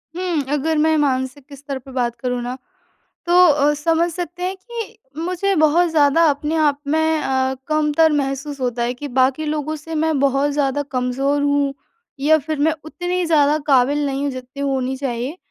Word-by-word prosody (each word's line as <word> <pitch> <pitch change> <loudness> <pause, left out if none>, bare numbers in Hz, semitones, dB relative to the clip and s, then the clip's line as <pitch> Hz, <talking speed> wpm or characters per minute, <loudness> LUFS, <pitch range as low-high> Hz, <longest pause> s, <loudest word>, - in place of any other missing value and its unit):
हुँ, 355 -4 -1
अगर 310 +2 0
मैं 315 +1 +3
मानसिक 270 0 -1
स्तर 275 0 -6
पर 265 +1 -14
बात 240 -2 -1
करूँ 250 -1 -3
न 245 +1 -4 0.7
तो 345 - 0 0.2
अ, 295 -1 +3
समझ 330 +3 +1
सकते 355 +1 -6
हैं 375 +1 -2
कि 450 +2 -8 0.2
मुझे 365 +3 0
बहुत 315 +3 +4
ज़्यादा 305 +1 +4
अपने 295 +2 -2
आप 295 -2 +2
में 315 +1 +1
अ, 265 0 0
कमतर 310 +1 +3
महसूस 280 0 -2
होता 245 -2 -1
है 245 +1 -1
कि 290 +3 -7
बाकी 260 +4 +2
लोगों 305 +1 -2
से 320 +2 -8
मैं 315 -1 +1
बहुत 280 +1 +2
ज़्यादा 285 0 0
कमज़ोर 270 +3 0
हूँ 285 -1 +1 0.5
या 315 +2 +4
फिर 310 0 -4
मैं 315 +2 +3
उतनी 355 +3 -2
ज़्यादा 300 -1 +3
काबिल 285 +1 +3
नहीं 275 0 -2
हूँ, 285 - 0
जितनी 255 +1 -7
होनी 265 -1 -1
चाहिए 260 +2 -3
290 Hz, 180 wpm, -20 LUFS, 270-315 Hz, 0.7 s, बहुत